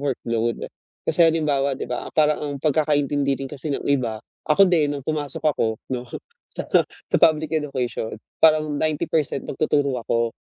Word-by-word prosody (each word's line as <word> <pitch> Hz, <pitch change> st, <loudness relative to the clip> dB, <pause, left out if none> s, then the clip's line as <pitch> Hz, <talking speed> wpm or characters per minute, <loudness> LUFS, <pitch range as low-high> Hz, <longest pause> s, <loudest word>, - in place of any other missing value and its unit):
workload. 115 Hz, -4 st, -2 dB, 0.4 s
Kasi 160 Hz, -, 0 dB
halimbawa, 145 Hz, -4 st, +1 dB
'di -, -, -4 dB
ba 125 Hz, -, -3 dB
parang 150 Hz, -1 st, +3 dB
ang 145 Hz, -1 st, -3 dB
pagkakaintindi 145 Hz, -2 st, +1 dB
rin 135 Hz, -, -6 dB
kasi 145 Hz, +1 st, -5 dB
ng -, -, -5 dB
iba. 120 Hz, -6 st, 0 dB, 0.3 s
Ako 195 Hz, +6 st, +6 dB
din 150 Hz, -4 st, +2 dB
'nung 140 Hz, -2 st, -7 dB
pumasok 150 Hz, -1 st, -3 dB
ako 115 Hz, -7 st, +1 dB, 0.2 s
'no 125 Hz, 0 st, -3 dB, 0.5 s
sa -, -, -5 dB, 0.2 s
sa -, -, -3 dB
Public 155 Hz, -1 st, +3 dB
Education. 130 Hz, -8 st, -2 dB, 0.2 s
Parang 155 Hz, -1 st, +4 dB
90% 155 Hz, -2 st, -1 dB
magtuturo 140 Hz, -3 st, 0 dB
ako, 115 Hz, 0 st, 0 dB
145 Hz, 150 wpm, -23 LUFS, 130-155 Hz, 0.5 s, Ako